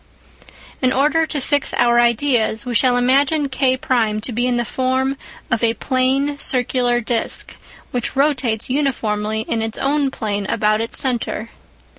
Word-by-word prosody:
In 255 -1 +2
order 300 +5 +2
to 295 - -2
fix 285 +1 0
our 240 0 +3
ideas, 240 -1 +1
we 250 - -4
shall 245 +2 +3
imagine 275 +4 +2
K1 255 -5 0
to 250 - -2
be 240 +2 0
in 250 - 0
the 240 0 -1
form 260 +2 -1 0.4
of 225 0 0
a 230 0 +2
plane 270 +4 0
circular 245 -2 +1
disc, 230 0 -1 0.4
which 245 +1 -3
rotates 265 -6 +1
uniformly 220 -6 -1
in 225 0 -3
its 225 0 -1
own 280 0 0
plane 205 -6 -4
about 215 +1 +1
its 230 - -2
centre. 240 -3 -2
250 Hz, 150 wpm, -19 LUFS, 225-270 Hz, 0.4 s, our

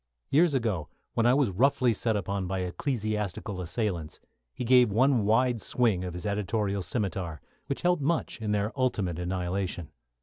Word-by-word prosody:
Years 155 0 +4
ago, 105 - -1 0.2
when 115 0 +2
I 125 - +5
was 135 -7 +2
roughly 125 +3 +3
set 110 +1 0
upon 100 -1 -2
by 95 0 -2
ecclesiastical 105 -1 -2
assailants, 85 -3 -3 0.3
he 125 - -5
gave 125 -2 +5
one 125 0 +3
wide 115 +2 +2
swing 110 -7 +1
of 90 -1 -5
his 90 - -6
editorial 100 0 -1
scimitar, 95 - -2 0.3
which 140 - -3
helped 180 -3 +2
much 155 -4 -1
in 105 -1 -1
their 105 +1 0
ultimate 105 -10 0
annihilation. 90 -1 -3
105 Hz, 160 wpm, -28 LUFS, 90-125 Hz, 0.3 s, I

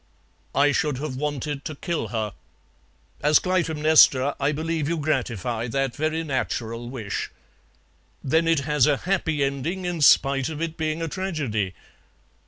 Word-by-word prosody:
'" - - -29
"I 145 - +4
should 150 -2 0
have 140 -1 -4
wanted 145 0 -3
to 155 - -5
kill 170 +3 -3
her." 110 -3 -3 0.9
"As 150 +1 +5
Clytemnestra 155 -6 +4
I 140 +1 +1
believe 160 0 -2
you 170 - 0
gratify 120 - -1
that 135 +1 -1
very 155 +2 -1
natural 120 -5 -3
wish." 110 -6 -4 0.9
"Then 160 +5 +2
it 165 -3 +3
has 150 -1 +2
a 145 -2 +3
happy 160 -5 0
ending, 140 +7 -2
in 175 -3 -2
spite 135 -1 +4
of 155 -2 -6
it 165 -1 -3
being 160 0 -2
a - - -1
tragedy?" 145 - -2
150 Hz, 150 wpm, -24 LUFS, 130-160 Hz, 0.9 s, As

